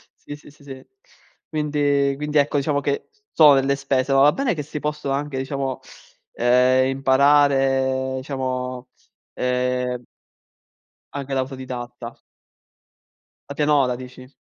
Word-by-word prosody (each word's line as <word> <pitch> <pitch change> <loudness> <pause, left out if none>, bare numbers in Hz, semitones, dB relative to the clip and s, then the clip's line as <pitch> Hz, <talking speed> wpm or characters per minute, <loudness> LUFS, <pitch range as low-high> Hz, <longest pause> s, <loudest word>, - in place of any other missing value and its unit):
sì, 145 - -10
sì, 150 - -16
sì, 145 0 -21
sì. 135 -2 -11 0.6
Quindi 145 -2 0
quindi 150 +1 -2
ecco, 145 0 +2
diciamo 140 0 0
che 140 0 -3 0.2
sono 150 -3 +7
delle 135 +1 +1
spese, 135 -1 -1
ma 135 - +5
va 145 +2 +6
bene 270 -3 0
che 150 - -4
si 150 +1 -6
possono 150 -2 -3
anche 140 0 -3
diciamo, 135 -1 -3 0.5
ehm, 125 +2 +3
imparare, 135 -1 +2
diciamo, 130 -2 -4 0.5
ehm 125 0 -1 1.1
anche 140 -1 -5
da 130 - +2
autodidatta. 125 -2 -7 1.3
La 140 - -6
pianola 145 -4 +2
dici? 130 +1 -12
135 Hz, 125 wpm, -22 LUFS, 130-145 Hz, 1.3 s, sono